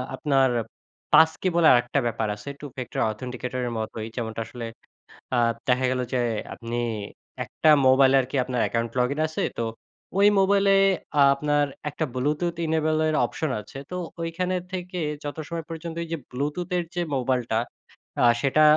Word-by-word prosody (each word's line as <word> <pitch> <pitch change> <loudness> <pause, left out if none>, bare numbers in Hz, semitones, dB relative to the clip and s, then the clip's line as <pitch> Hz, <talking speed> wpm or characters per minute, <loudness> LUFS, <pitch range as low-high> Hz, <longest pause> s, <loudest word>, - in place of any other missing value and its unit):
আপনার 135 -2 +3 0.6
passkey 160 +3 +5
বলে 170 -2 +5
আরেকটা 120 +3 +2
ব্যাপার 115 -1 -1
আছে 105 +6 -9
Two 145 - -7
factor 125 -3 -4
authenticator 125 +2 -4 0.2
মতোই। 110 0 -4
যেমনটা 115 -2 -3
আসলে 120 +1 -7 0.7
আ - - +2 0.3
দেখা 130 0 +3
গেল 130 0 0
যে 125 - +2 0.3
আপনি 115 0 -5 0.7
একটা 160 - +1 0.2
মোবাইলে 130 +1 +6
আর - - -5
কি - - -3
আপনার 125 -2 -1
অ্যাকাউন্ট 115 0 -1
লগইন 135 +4 +1
আছে। 155 - -2 0.2
তো 115 - 0 0.5
ঐ - - +3 0.2
মোবাইলে 195 0 +4 0.5
আ - - +7
আপনার 145 0 +1 0.2
একটা 155 +2 -2
ব্লুটুথ 150 +6 0
enable 155 0 +1
এর 155 - +1
অপশন 155 +4 -3
আছে। 105 - -12
তো 180 - -3 0.2
ঐখানে 180 +2 -1 0.2
থেকে 180 0 -4 0.2
যত 145 +2 -5
সময় 165 -2 -5
পর্যন্ত 165 0 -6
এই 165 - -9
যে - - -1
ব্লুটুথের 170 +7 -2
যে 175 - 0
মোবাইলটা 125 -3 0 0.6
আ - - +7 0.2
সেটা 140 +2 +3
140 Hz, 155 wpm, -25 LUFS, 125-160 Hz, 0.7 s, আ